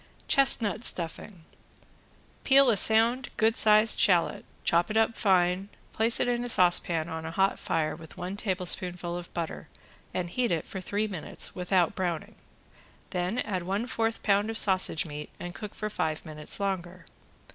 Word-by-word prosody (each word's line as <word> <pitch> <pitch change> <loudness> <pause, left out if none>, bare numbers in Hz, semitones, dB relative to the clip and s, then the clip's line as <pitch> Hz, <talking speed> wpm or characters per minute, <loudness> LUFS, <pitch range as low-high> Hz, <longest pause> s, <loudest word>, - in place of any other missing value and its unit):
~CHESTNUT 235 -5 +3
STUFFING~ 170 0 -3 1.0
Peel 275 -2 +5
a - - +2
sound 230 +5 +4
good 225 +1 +2
sized 215 +1 +5
shallot, 175 -4 +2 0.2
chop 170 +3 +2
it 215 - -1
up 225 0 +2
fine, 185 -1 +1 0.2
place 225 +2 +4
it - - 0
in 240 0 -1
a 245 - -4
saucepan 175 -4 +2
on 160 -1 -6
a 160 - -5
hot 195 +4 0
fire 155 -1 -2
with 160 -1 -14
one 180 +2 -5
tablespoonful 180 -3 -1
of 175 0 -8
butter 165 -2 -5 0.4
and 175 -1 -4
heat 245 -1 -1
it 165 -3 -1
for 190 - -7
three 205 +3 -2
minutes 190 -7 -4
without 180 -1 0
browning. 175 -4 -4 0.8
Then 180 +5 -2
add 195 -7 -2
one 195 +6 -3
fourth 225 -2 -2
pound 205 +1 +1
of 225 - -2
sausage 185 -6 +2
meat 150 -1 -8
and 175 0 -7
cook 210 +1 -9
for 215 - -4
five 155 -4 -3
minutes 155 +2 -3
longer. 180 -3 -4
185 Hz, 165 wpm, -27 LUFS, 175-220 Hz, 1.0 s, Peel